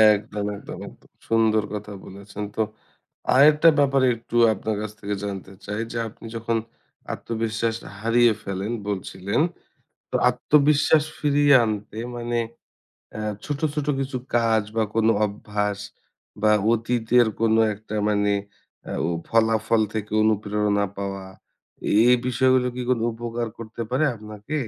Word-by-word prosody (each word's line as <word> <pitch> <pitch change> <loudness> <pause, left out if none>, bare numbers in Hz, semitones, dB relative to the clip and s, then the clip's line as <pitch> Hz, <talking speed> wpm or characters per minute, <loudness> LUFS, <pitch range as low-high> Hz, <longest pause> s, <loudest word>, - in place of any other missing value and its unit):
একদম, 105 0 -5
একদম, - - -9
একদম - - -16 0.2
সুন্দর 110 -1 +3
কথা 105 0 -5
বলেছেন। 100 +2 -8
তো 110 - +1 0.7
আরেকটা 150 +4 +7
ব্যাপার 135 -1 +3
একটু 115 +1 -9 0.2
আপনার 110 +2 -3
কাছ 110 -1 -4
থেকে 100 0 -3
জানতে 95 -1 -6
চাই। 105 +1 -3
যে 120 - -4
আপনি 115 - -15
যখন 115 0 -1 0.6
আত্মবিশ্বাসটা 115 0 -3
হারিয়ে 115 0 +4
ফেলেন 100 +3 -3 0.2
বলছিলেন। 95 +4 -2 0.7
তো - - -2
আত্মবিশ্বাস 145 +4 +3 0.2
ফিরিয়ে 145 -1 +4
আনতে 105 0 -4 0.2
মানে 120 0 -2 0.8
অ্যা - - -7 0.3
ছোট, 145 -1 -3
ছোট 150 -1 -2
কিছু 135 -1 -3 0.2
কাজ 115 -2 +3
বা 110 - +3
কোন 110 0 +2 0.2
অভ্যাস 105 0 -2 0.6
বা 110 - +5 0.2
অতীতের 115 +1 +2
কোন 110 -1 +3 0.2
একটা 110 +1 -9
মানে 105 -1 +2 0.6
আ - - -3
ও - - -1 0.2
ফলাফল 110 0 +2
থেকে 105 -1 -4
অনুপ্রেরণা 105 -1 +1
পাওয়া, 100 -1 -4 0.6
এই, - - +3
এই 125 - +7
বিষয়গুলো 130 0 +3
কি 125 - -4
কোন 125 - +3
উপকার 120 0 -4
করতে 115 0 -6
পারে 135 +5 +2
আপনাকে? 105 +6 -8
110 Hz, 135 wpm, -24 LUFS, 105-120 Hz, 0.8 s, আরেকটা